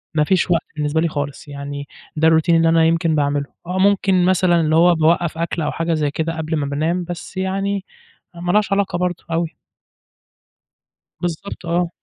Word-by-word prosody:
مفيش 175 +4 +2
وقت 170 - +3
بالنسبة 150 +1 0
لي 170 - +2
خالص، 145 -3 -5
يعني 140 0 -6 0.3
ده 160 +1 +4
الRoutine 160 +1 +2
اللي 165 0 +4
أنا 165 0 +4
يمكن 165 -1 +2
باعمِله، 145 -1 0 0.2
آه، 180 +1 -2
ممكن 195 -2 +3
مثلًا 180 -2 +3
اللي 155 0 +1
هو 175 +1 +5
باوقَّف 165 +1 +2
أكل 170 0 -2
أو 150 - -1
حاجة 165 0 -1
زي 150 -2 0
كده 165 +2 -3
قبل 160 0 -2
ما 150 -2 -1
بانام، 160 +6 -1
بس 175 +1 -8
يعني 195 +1 -1 0.5
ما 175 +1 -2
لهاش 210 +1 +2
علاقة 195 -3 0
برضه 180 -1 -2
أوي. 165 0 -2 1.6
بالضبط، 175 +2 -5
آه. 170 +1 0
165 Hz, 175 wpm, -20 LUFS, 155-180 Hz, 1.6 s, هو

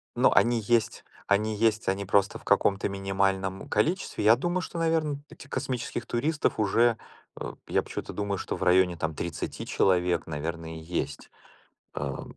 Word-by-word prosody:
Но - - +4
они 120 0 +4
есть, 115 +1 +1 0.2
они 105 +2 +2
есть, 110 0 +1
они 95 +1 0
просто 100 0 +2
в - - -19
каком-то 100 0 +2
минимальном 95 -1 -1
количестве. 180 - 0
Я 110 +2 +7
думаю, 175 +8 -1
что, 175 - -6
наверно, 160 -3 +1
эти 140 - -13
космических 130 -3 -3
туристов 150 +4 0
уже, 115 +3 +3 0.4
о, - - -5
я - - +2
почему-то - - -6
думаю, 100 -1 -2
что - - -4
в - - -4
районе 90 0 +4
там 80 -1 -3
30 85 +1 -4
человек, 90 -2 +2
наверное, 80 +1 -4
есть, 85 +2 -4 0.6
ам. - - -5
100 Hz, 155 wpm, -27 LUFS, 95-120 Hz, 0.6 s, Я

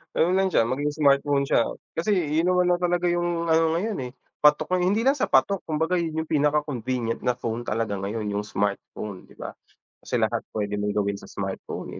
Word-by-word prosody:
Ganun 170 - +3
lang 195 - +3
siya, 180 - +3
maging 135 +5 -1
smartphone 140 -1 +3
siya. 125 -4 +2 0.3
Kasi 205 +5 +2
iyon 165 -1 +1
naman 180 -1 +3
na 175 - +2
talaga 175 0 0
yung 175 -1 0
ano 160 0 +3
ngayon 205 +4 -2
eh, - - -10 0.3
patok 150 +5 +3
eh. - - 0
Hindi 210 +4 +2
lang 270 +2 +3
sa - - +1
patok 135 +9 +3
kumbaga 160 +3 0
'yon 160 -1 -2
yung 160 - -17
pinaka-convenient 140 -6 0
na 125 -1 0
phone 120 -1 -4
talaga 105 -2 -1
ngayon, 105 +2 -3
yung 105 +1 -3
smartphone, 100 -1 -4
di - - -18
ba? - - -7 0.5
Kasi - - -4
lahat - - +1 0.2
puwede 105 -1 -2
mong 105 0 -2
gawin 100 -1 0
sa - - -13
smartphone - - -6
150 Hz, 200 wpm, -25 LUFS, 115-175 Hz, 0.5 s, Ganun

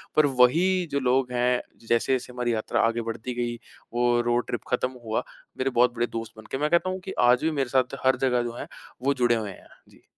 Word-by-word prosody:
पर 155 - +5
वही 165 +8 +3
जो 140 - +1
लोग 125 0 +1
हैं 125 0 +1 0.3
जैसे-जैसे 125 +1 +1
हमारी 120 -1 -1
यात्रा 110 - 0
आगे 115 0 -1
बढ़ती 115 +2 -5
गई, 120 -1 -2 0.4
वो 120 0 +2
रोड 120 0 +1
ट्रिप 120 - -3
ख़त्म 125 +1 +1
हुआ, 110 0 -1 0.3
मेरे 130 +1 0
बहुत 125 -1 +3
बड़े 120 +1 0
दोस्त 115 -1 -6
बन 110 - -11
गए, 135 - -1
मैं 150 +1 +1
कहता 170 +2 +2
हूँ 185 0 -3
कि 190 - -6
आज 125 +3 +4
भी 160 - +2
मेरे 135 -4 -1
साथ 130 +1 +1
हर 130 - +5
जगह 125 -2 +2
जो 120 - -3
है - - -6 0.4
वो 140 +1 +3
जुड़े 120 -2 +2
हुए 105 -3 -3
हैं। - - -15 0.2
जी। - - -22
125 Hz, 230 wpm, -26 LUFS, 120-135 Hz, 0.4 s, पर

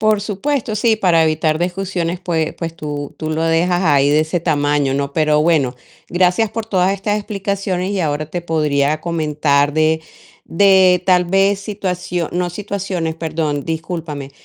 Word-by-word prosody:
Por 215 -1 +2
supuesto, 220 +3 -2
sí, 220 +1 +2
para 175 -6 +3
evitar 155 0 +1
discusiones, 180 -1 -2
pues 165 -3 -1
pues 165 -1 -5
tú 145 -3 -5
tú 155 - -4
lo 155 +1 -1
dejas 175 +2 +2
ahí 145 -4 +3
de 150 +1 +4
ese 160 +2 -1
tamaño, 145 -4 +1
¿no? 140 0 -2
Pero 155 -1 +2
bueno, 150 -6 +2 0.3
gracias 185 +5 +2
por 225 0 -4
todas 190 -3 +1
estas 205 +2 -1
explicaciones 195 -2 -3
y 200 - -1
ahora 150 -1 -1
te 175 +3 -5
podría 150 -2 0
comentar 150 -3 +1
de 155 +1 +2 0.4
de 185 -1 +4
tal 180 -1 +4
vez 195 +2 +2
situacio 180 -4 -3
no 180 0 -1
situaciones, 190 -4 -3
perdón, 155 -3 -2
discúlpame, 160 -4 -5
170 Hz, 160 wpm, -18 LUFS, 155-190 Hz, 0.4 s, de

